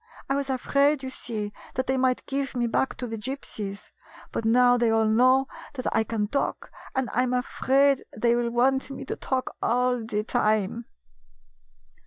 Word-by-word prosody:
I - - 0
was 280 0 -1
afraid, 280 +2 +2
you 260 - -4
see, 215 -5 -5 0.2
that 260 - 0
they 265 - +1
might 255 -1 +1
give 275 -1 -2
me 240 -1 +1
back 235 +3 0
to 250 - -4
the 225 -2 -5
Gypsies. 210 -5 -6 0.4
But 230 - -3
now 245 +2 +5
they 240 -1 +2
all 225 0 +3
know 255 +5 +4 0.3
that 255 - -5
I 225 - +4
can 220 -2 -2
talk, 275 +6 -2 0.2
and 265 -1 0
I 250 - +3
'm 250 0 0
afraid 270 +2 +2
they 235 +2 +3
will 240 0 0
want 265 +4 +2
me 275 - -7
to - - -3
talk 260 -1 -2
all 245 0 +1
the 210 -2 -2
time." 215 +1 0
250 Hz, 180 wpm, -26 LUFS, 225-265 Hz, 0.4 s, now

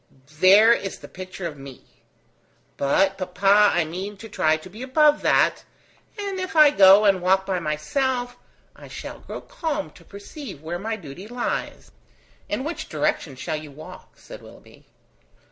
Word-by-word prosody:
There 205 +6 +7
is 195 -4 -4
the - - -12
picture 185 0 -8
of 150 -4 -6
me! 135 -2 -12 0.9
But, 190 +8 +1
papa, 195 +3 +3
I 175 -2 +2
mean 190 +6 -6
to 225 +3 -11
try 155 -5 +1
to 155 - -13
be 210 +6 -12
above 295 +3 +3
that, - - +2 0.5
and 400 -2 -4
if 370 0 -5
I 305 -2 +7
go 200 -3 +7
and 195 -3 +3
walk 190 +1 +2
by 190 -2 -1
myself, 245 - -2 0.4
I - - -13
shall - - -8
grow - - -8
calm 320 -12 -4
to - - -18
perceive 200 - -10
where 170 +2 -4
my 220 +3 -3
duty 180 0 -10
lies.. 240 +1 -4 0.3
." - - -33
"In 260 - -2
which 325 +4 -5
direction 140 -4 -2
shall 155 +4 -4
you 155 0 -9
walk?" 145 +3 -13
said - - -12
Willoughby. - - -17
195 Hz, 165 wpm, -23 LUFS, 170-245 Hz, 0.9 s, There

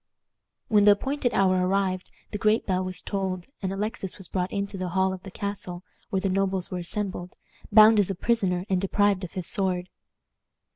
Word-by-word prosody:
When 210 -4 +4
the 205 - +9
appointed 265 +3 -1
hour 185 -1 +3
arrived 185 0 0 0.2
the 210 - -4
great 215 +2 +2
bell 185 -1 0
was 185 0 -6
tolled, 190 -3 -3 0.2
and 190 -1 -2
Alexis 195 -1 -4
was 190 -3 -6
brought 180 -1 -2
into 200 0 -3
the 185 -1 -3
hall 190 0 +3
of 185 - -7
the 195 - -9
castle, 185 -2 -4 0.3
where 195 - 0
the 195 - 0
nobles 190 -1 0
were 180 - -3
assembled, 185 0 -4 0.4
bound 215 +1 +8
as 200 - +2
a 195 - -2
prisoner, 190 -4 0
and 185 -2 +1
deprived 200 0 +2
of 180 - -6
his 185 -3 -4
sword. 185 -2 -1
190 Hz, 190 wpm, -26 LUFS, 185-205 Hz, 0.4 s, the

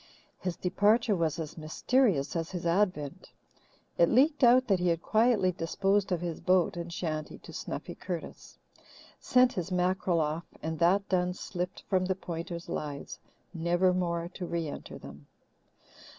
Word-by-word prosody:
His 180 -2 -3
departure 205 +4 +2
was 165 -2 0
as 160 0 -6
mysterious 160 - +1
as 165 -1 -2
his 180 -2 -5
advent. 170 -5 0 0.7
It 170 - +6
leaked 285 +4 +3
out 250 +2 +6
that 195 -4 +3
he 180 - 0
had 170 -1 +1
quietly 220 -4 +3
disposed 195 +3 0
of 175 -2 0
his 170 -2 -4
boat 180 -2 +3
and 170 0 -5
shanty 155 -3 -4
to - - -13
Snuffy - - -5
Curtis, - - -7 0.6
sent 250 0 +4
his 180 0 -4
mackerel 180 -1 +1
off 155 +2 -2 0.2
and, 160 0 -3
that 190 +4 +3
done, 180 -1 +1
slipped 180 0 -5
from 185 -2 +2
the 190 0 0
Pointers' 170 -1 -6
lives, 145 -2 -5 0.3
never 175 +2 +2
more 170 -2 -1
to 180 - -5
re 170 -2 -2
enter 145 - -7
them. - - -12
180 Hz, 155 wpm, -30 LUFS, 165-195 Hz, 0.7 s, It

